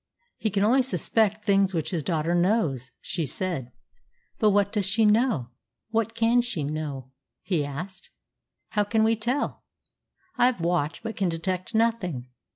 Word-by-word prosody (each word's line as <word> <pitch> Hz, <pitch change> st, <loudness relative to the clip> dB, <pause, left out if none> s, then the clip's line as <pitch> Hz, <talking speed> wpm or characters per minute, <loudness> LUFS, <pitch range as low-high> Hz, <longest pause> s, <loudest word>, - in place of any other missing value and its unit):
"He 220 Hz, -, 0 dB
can 200 Hz, 0 st, +1 dB
only 250 Hz, +6 st, +5 dB
suspect 215 Hz, -, +1 dB
things 195 Hz, -2 st, +3 dB
which 160 Hz, -, -1 dB
his 170 Hz, -4 st, -1 dB
daughter 165 Hz, +1 st, 0 dB
knows," 175 Hz, -, +1 dB
she 170 Hz, -5 st, -3 dB
said. 150 Hz, -7 st, -3 dB, 0.7 s
"But 215 Hz, -, +5 dB
what 200 Hz, 0 st, +2 dB
does 205 Hz, -3 st, 0 dB
she 220 Hz, +3 st, +2 dB
know? 210 Hz, -, +2 dB, 0.4 s
What 225 Hz, 0 st, 0 dB
can 230 Hz, +1 st, +4 dB
she 215 Hz, -11 st, -2 dB
know?" 140 Hz, -3 st, -4 dB, 0.3 s
he 170 Hz, -6 st, 0 dB
asked. 165 Hz, +7 st, -7 dB, 0.6 s
"How 210 Hz, -2 st, +1 dB
can 220 Hz, +2 st, +1 dB
we 225 Hz, +1 st, +3 dB
tell? 240 Hz, +6 st, -2 dB, 0.8 s
I 245 Hz, -, +6 dB
have 255 Hz, -5 st, 0 dB
watched, 165 Hz, -2 st, -1 dB
but 225 Hz, -1 st, -4 dB
can 195 Hz, -3 st, 0 dB
detect 185 Hz, +5 st, -3 dB
nothing. 185 Hz, -, 0 dB
195 Hz, 160 wpm, -26 LUFS, 165-225 Hz, 0.8 s, I